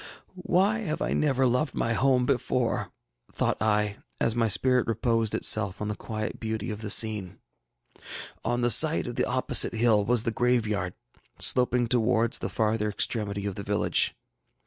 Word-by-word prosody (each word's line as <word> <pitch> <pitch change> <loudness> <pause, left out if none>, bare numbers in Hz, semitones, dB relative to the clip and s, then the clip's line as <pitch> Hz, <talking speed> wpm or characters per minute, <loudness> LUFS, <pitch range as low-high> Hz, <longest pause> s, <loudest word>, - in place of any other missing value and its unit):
ŌĆ£ŌĆśWhy 205 +5 +2
have 155 - -3
I - - -2
never 135 -3 +1
loved 125 +4 0
my 115 - -1
home 125 +1 +2
before? 125 -2 -1 0.4
ŌĆÖ - - -30
thought - - -1
I, 105 -1 0 0.2
as 115 - 0
my 115 -1 +1
spirit 125 +3 +2
reposed 115 -1 0
itself 100 -3 +1
on 105 - -4
the 105 - -3
quiet 110 0 -6
beauty 110 0 -4
of 105 0 -7
the 105 - -5
scene. 105 -4 +2 1.1
ŌĆ£On 120 +1 -1
the 120 - +3
side - - +4
of - - -5
the - - -1
opposite - - +2
hill 110 -2 +3
was 120 +1 +2
the 115 - -1
graveyard, 110 -6 -1 0.4
sloping 125 -1 +2
towards 115 -1 +1
the - - -4
farther 110 -1 -1
extremity 100 -1 -1
of 100 - -3
the 100 - -7
village. 100 +1 +1
115 Hz, 170 wpm, -26 LUFS, 105-125 Hz, 1.1 s, side